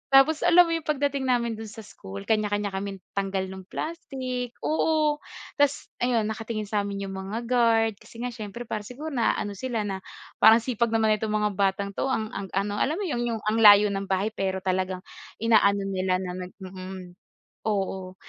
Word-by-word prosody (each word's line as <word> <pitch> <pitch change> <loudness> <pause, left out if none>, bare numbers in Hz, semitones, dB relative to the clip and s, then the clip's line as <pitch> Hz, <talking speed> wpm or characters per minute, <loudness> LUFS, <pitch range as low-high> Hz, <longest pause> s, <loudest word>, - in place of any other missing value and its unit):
tapos 305 +3 +6
alam 355 +1 +8
mo 335 - -3
yung 330 -2 -1
pagdating 280 -2 0
namin 235 -3 +1
dun 220 - -6
sa 215 +1 -10
school 100 - -9
kanya-kanya 205 - 0
kaming 195 0 -5
tanggal 195 -1 -1
nung 190 -1 -9
plastic, 255 -5 -4
oo, 310 -1 +2 0.4
tapos 285 0 +1
ayun, 240 -2 +2
nakatingin 220 -1 -4
sa 205 -2 0
amin 200 0 -4
yung 195 - -6
mga 205 +5 -4
guard 230 -2 +3
kasi 230 - -12
nga 250 - -2
siyempre, 225 0 -7
parang 215 -3 -4
siguro 300 +6 -6
naaano 230 -5 0
sila, 235 -1 -2
na 195 -2 -3 0.4
parang, 225 +1 +8
"Sipag 235 -1 +1
naman 220 -1 +3
itong 215 0 -2
mga 210 0 +1
batang 200 0 +1
ito." 200 - -2
Ang 220 -5 -1
ang 195 - -5
ano, 205 +1 0
alam 300 - +1
mo 410 - -3
iyon, 265 -10 -1
yung 220 - -6
ang 215 +2 +1
layo 205 -1 +8
ng 195 0 -3
bahay 195 +3 0
pero 190 -3 -2
talagang 185 0 -1 0.4
inaano 205 -3 +4
nila 190 -1 0
na 180 - -4 0.2
nag - - -18
mm, 185 -1 -8 0.5
oo. 190 -3 -2
215 Hz, 185 wpm, -26 LUFS, 195-245 Hz, 0.5 s, alam